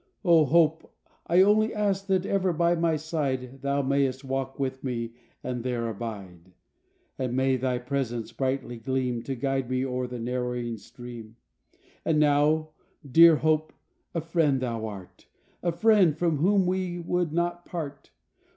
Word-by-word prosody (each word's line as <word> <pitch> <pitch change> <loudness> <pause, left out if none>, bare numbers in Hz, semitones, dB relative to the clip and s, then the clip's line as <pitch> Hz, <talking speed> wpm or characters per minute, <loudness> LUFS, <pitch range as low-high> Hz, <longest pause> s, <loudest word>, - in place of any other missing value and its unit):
0 170 -4 +5
Hope! 160 +2 +2 0.4
I 175 +3 +6
only 215 +2 +3
ask 200 -2 0
that 190 -1 +1
ever 190 -2 +1
by 170 +1 +2
my 165 -1 +1
side, 135 -5 -3
Thou 140 0 0
may'st 135 0 0
walk 135 0 -3
with 130 -1 -3
me 115 -3 -3 0.3
and 125 -2 -3
there 120 -2 -2
abide, 95 -6 -7 0.7
And 125 -2 -2
may 130 0 +2
thy 130 0 -1
presence 125 -3 -3
brightly 130 0 -2
gleam 125 0 -2
To 135 +3 -4
guide 135 0 -1
me 130 +1 0
o'er 125 -1 -2
the 125 0 -6
narrowing 125 -1 -3
stream. 115 0 -11 0.7
And 155 -2 +2
now 150 +1 +3 0.4
dear 165 +4 +8
Hope, 155 0 +1 0.4
a 165 - 0
friend 160 -4 +1
thou 115 -3 -3
art, 100 -4 -11 0.3
A 175 - 0
friend 190 -4 +4
from 165 -2 +1
whom 190 +5 +3
we 180 -1 -1
would 175 -1 -1
not 175 +1 -1
part. 150 -5 -6
135 Hz, 150 wpm, -27 LUFS, 125-165 Hz, 0.7 s, dear